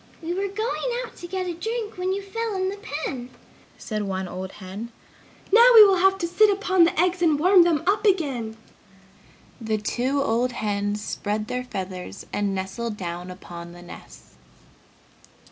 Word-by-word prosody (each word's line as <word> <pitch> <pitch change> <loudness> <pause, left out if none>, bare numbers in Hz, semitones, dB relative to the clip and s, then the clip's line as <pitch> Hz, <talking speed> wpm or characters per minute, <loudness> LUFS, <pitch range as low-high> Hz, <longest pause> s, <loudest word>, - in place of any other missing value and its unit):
"We 335 +1 -4
were 390 +2 -1
going 450 +4 -2
out - - -14
to 350 - -8
get 370 +1 -3
a 355 - -3
drink 445 +5 -4
when 365 +1 -1
you 395 +1 -2
fell 450 +2 -3
in 375 0 0
the 400 - -5
pen!" 280 - -5 0.5
said 215 -2 -4
one 190 -2 -3
old 185 +1 -6
hen. 200 +4 -8 0.6
"Now 470 +3 +8
we 435 -2 +12
will 390 -2 +4
have 385 +2 +4
to 345 -3 -2
sit 420 +5 +4
upon 380 -3 +3
the 335 - -1
eggs 360 +1 +2
and 320 -4 +4
warm 365 +4 +6
them 335 -3 +2
up 410 +3 +2
again!" 275 - 0 1.0
The 220 -1 -1
two 250 +6 -1
old 245 0 0
hens 205 -1 -2
spread 210 +1 -2
their 250 +1 -3
feathers 185 -6 -6
and 200 -1 0
nestled 210 +4 -4
down 175 -1 -5
upon 175 -2 -9
the 175 0 -12
nests. 175 - -13
285 Hz, 175 wpm, -24 LUFS, -, 1.0 s, we